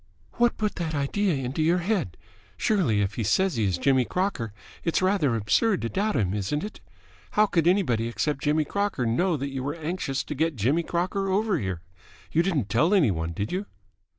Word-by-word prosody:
"What 240 0 +3
put 210 -1 -2
that 160 -3 -2
idea 170 +6 0
into 135 +3 -2
your 165 +3 +3
head? 180 - -1 0.4
Surely, 160 - +2
if 100 +1 -1
he 115 - 0
says 190 - +2
he 110 -2 +1
is 95 -3 0
Jimmy 130 +4 +3
Crocker, 180 - -2 0.3
it's 165 - +1
rather 185 - +2
absurd 145 - +2
to 115 - -1
doubt 205 - 0
him, 95 -3 +1
isn't 105 +9 -2
it? 210 - -7 0.5
How 215 - +5
could 170 -5 +1
anybody 140 - +2
except 135 +4 -2
Jimmy 150 +1 +2
Crocker 200 -10 -1
know 160 +9 +1
that 140 +1 -4
you 135 -1 -4
were 145 +3 -2
anxious 155 -4 -3
to - - -5
get 160 +2 0
Jimmy 130 +10 +2
Crocker 185 +3 -1
over 205 +2 +1
here? 95 -4 -4 0.5
You 165 - +3
didn't 165 - 0
tell 140 - +3
any 150 - +4
one, 80 -1 -2
did 100 +6 -3
you?" 195 +3 -3
155 Hz, 200 wpm, -26 LUFS, 115-190 Hz, 0.5 s, How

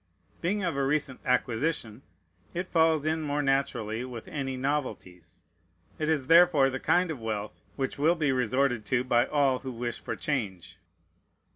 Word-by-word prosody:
Being 195 +4 0
of 175 -5 -1
a 140 - 0
recent 135 -2 0
acquisition, 125 -1 0 0.5
it 180 +1 -2
falls 160 -2 +3
in 160 +1 0
more 145 -1 -1
naturally 125 -5 0
with 125 -3 -8
any 135 -2 -4
novelties. 125 - -4 0.6
It 155 0 0
is 150 -5 +1
therefore 165 -4 +6
the 130 - -3
kind 180 +3 +2
of 140 -7 -6
wealth 105 -2 -4
which 135 0 -3
will 160 +4 +4
be 155 -4 +1
resorted 125 -1 +1
to 120 +5 +1
by 120 -2 +2
all 140 -3 +2
who 130 - -6
wish 120 0 -4
for - - -5
change. 105 - -4
135 Hz, 160 wpm, -28 LUFS, 120-155 Hz, 0.6 s, therefore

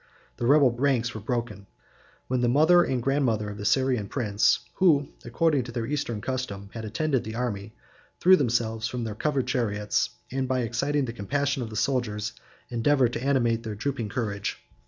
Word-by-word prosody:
The 120 - -1
rebel 140 -2 +6
ranks 120 -1 0
were 110 - -6
broken; 110 -4 -3 0.6
when 125 -1 0
the 120 - +3
mother 160 +7 +6
and 125 -6 -1
grandmother 115 -7 +1
of 105 - -9
the 105 - -5
Syrian 130 -4 +2
prince, 105 -5 +2 0.2
who, 150 -7 +4
according 145 +4 +1
to 120 - -7
their 115 -1 -3
eastern 120 -6 -2
custom, 105 -7 -4
had 115 -1 -6
attended 130 +5 0
the 110 +1 -6
army, 110 -3 -3 0.4
threw 185 +1 +7
themselves 115 -6 0
from 125 -1 -4
their 110 -2 -3
covered 135 +4 -1
chariots, 110 -5 0 0.2
and, 130 0 -1
by 130 0 0
exciting 135 +5 0
the 115 - -5
compassion 140 +6 -1
of 115 - -4
the 110 - -8
soldiers, 110 -2 -1 0.4
endeavored 125 +1 +2
to - - -3
animate 120 -5 +2
their 110 -2 -5
drooping 120 0 -3
courage. 100 -3 -3
120 Hz, 175 wpm, -26 LUFS, 110-135 Hz, 0.6 s, threw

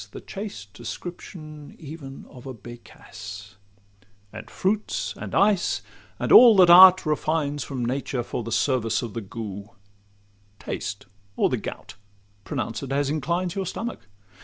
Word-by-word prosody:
The - - -9
chaste 195 - -8
description 155 - -9
even 145 -3 -10
of 130 -1 -13
a 130 - -6
'becasse;' 100 -3 -11 0.8
And 110 - -9
fruits, 210 +3 -1
and - - -6
ice, 200 -2 +2 0.3
and - - -2
all 240 -3 +10
that 180 -3 +7
art 185 +1 +9
refines 150 -2 -1
From 125 0 -4
nature 130 0 -2
for 120 - -4
the 115 - -6
service 125 -2 +1
of 115 - -6
the 115 - -4
gout— 100 -1 -8 0.8
Taste - - -5 0.3
or - - +2
the - - 0
gout,—pronounce 100 +2 -7
it 135 -1 -6
as 140 0 0
inclines 170 +4 -1
Your 195 -2 -3
stomach! 230 - -6
135 Hz, 135 wpm, -24 LUFS, 115-175 Hz, 0.8 s, all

